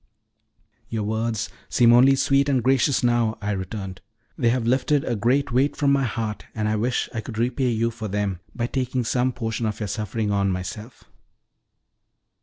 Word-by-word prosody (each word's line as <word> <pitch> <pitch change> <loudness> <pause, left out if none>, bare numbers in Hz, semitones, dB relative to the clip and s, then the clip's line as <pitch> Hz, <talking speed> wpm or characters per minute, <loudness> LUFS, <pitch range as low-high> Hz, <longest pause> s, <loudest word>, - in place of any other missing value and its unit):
"Your 110 -2 -2
words 110 +1 -1 0.2
seem 120 -1 +5
only 130 +3 +6
sweet 140 +1 +2
and 130 -4 +2
gracious 130 +1 +2
now," 120 -2 +2
I 105 -1 -2
returned. 95 -1 -5 0.3
"They 120 -6 +2
have 120 -1 0
lifted 135 +4 +2
a 120 - -1
great 125 +6 +1
weight 130 +4 +2
from 140 -1 +2
my 135 -1 +2
heart, 110 -2 -3
and 105 -1 -1
I 110 - +1
wish 120 +4 0
I 115 - -2
could 110 0 -8
repay 125 +2 +1
you 115 0 0
for 110 -1 -6
them 100 -2 -2 0.2
by 120 - -1
taking 130 0 -1
some 125 +2 +1
portion 115 -2 -3
of 105 - -4
your 105 - -2
suffering 105 +2 -2
on 100 -1 +1
myself." 95 +6 -5
115 Hz, 180 wpm, -24 LUFS, 105-125 Hz, 0.3 s, only